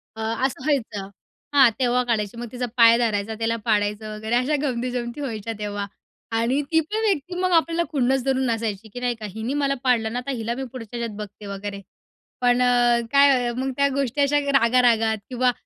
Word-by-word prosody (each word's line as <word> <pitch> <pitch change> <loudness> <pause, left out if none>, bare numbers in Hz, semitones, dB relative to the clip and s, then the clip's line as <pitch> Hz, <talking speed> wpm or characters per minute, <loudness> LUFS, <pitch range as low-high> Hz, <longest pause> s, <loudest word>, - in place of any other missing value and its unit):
अ, 220 - -7 0.2
असं 265 0 -3
व्हायचं, 225 -9 -1 0.5
हां. 270 -3 +8
तेव्हा 250 0 +2
काढायची 225 -2 -2
मग 240 - -5
तिचा 250 0 -3
पाय 230 0 +7
धरायचा 220 -2 0
त्याला 230 0 0
पाडायचं 210 0 0
वगैरे 220 +2 -2
अशा 255 +5 +2
गमती-जमती 245 -1 -3
व्हायच्या 225 -4 -4
तेव्हा 205 -1 -3 0.5
आणि 245 +5 +1
ती 320 - +5
पण 425 +8 -2
व्यक्ती 360 -3 -1
मग 370 0 +1
आपल्याला 335 +1 +1
खुन्नस 265 -2 +1
धरून 265 -1 +1
नसायची 225 -3 -2
की 245 - -6
नाही 245 -1 -1
का? 215 - -6
हिने 220 +6 -4
मला 280 -1 +1
पाडलं 230 -3 +1
ना, 245 - -1
तर - - 0
हिला 235 -2 -2
मी 265 - -4
पुढच्या 240 -2 -8
ह्याच्यात 230 -3 -4
बघते 210 0 -9
वगैरे. 200 0 -6 0.6
पण 245 0 +3
अ, 245 -1 +4
काय 275 -4 +4
मग 265 +1 -1
त्या 280 0 +4
गोष्टी 280 +1 0
अशा 290 +1 +3 0.2
रागा-रागात 230 -2 +3
किंवा 250 0 +2
245 Hz, 190 wpm, -23 LUFS, 220-265 Hz, 0.6 s, हां